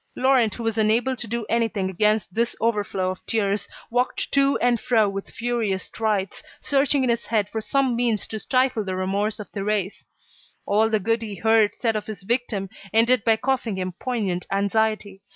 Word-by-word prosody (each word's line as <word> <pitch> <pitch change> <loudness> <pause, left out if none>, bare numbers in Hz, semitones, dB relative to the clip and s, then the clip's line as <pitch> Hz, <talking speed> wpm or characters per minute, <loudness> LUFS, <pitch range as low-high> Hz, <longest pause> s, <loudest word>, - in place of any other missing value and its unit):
Laurent 255 -5 +3
who 235 - -6
was 225 -1 -1
unable 225 +4 +2
to 240 - -5
do 235 0 -3
anything 225 -4 0
against 210 +1 +1
this 235 +3 0
overflow 205 -4 0
of 185 - -9
tears, 205 -2 0 0.2
walked 245 +1 -1
to 275 0 +3
and 240 -1 +2
fro 220 -3 +2
with 195 0 -5
furious 230 -5 -1
strides, 210 -4 -2 0.2
searching 280 -1 +2
in 255 - +1
his 235 0 -2
head 215 -4 +1
for 220 - -3
some 265 +1 +1
means 235 -3 0
to 220 - -6
stifle 255 -2 +1
the 190 -2 -3
remorse 200 +4 -1
of 210 - -8
Thérèse. 200 -1 -2 0.6
All 215 +2 +3
the 220 -1 +2
good 225 +3 0
he 210 -3 -5
heard 220 +1 +3
said 225 -2 0
of 210 - -3
his 205 -4 -7
victim 230 -3 -1 0.2
ended 230 +1 +4
by 225 - +4
causing 240 -3 -1
him 185 0 -2
poignant 200 -8 -2
anxiety. 200 0 0
220 Hz, 185 wpm, -23 LUFS, 200-235 Hz, 0.6 s, ended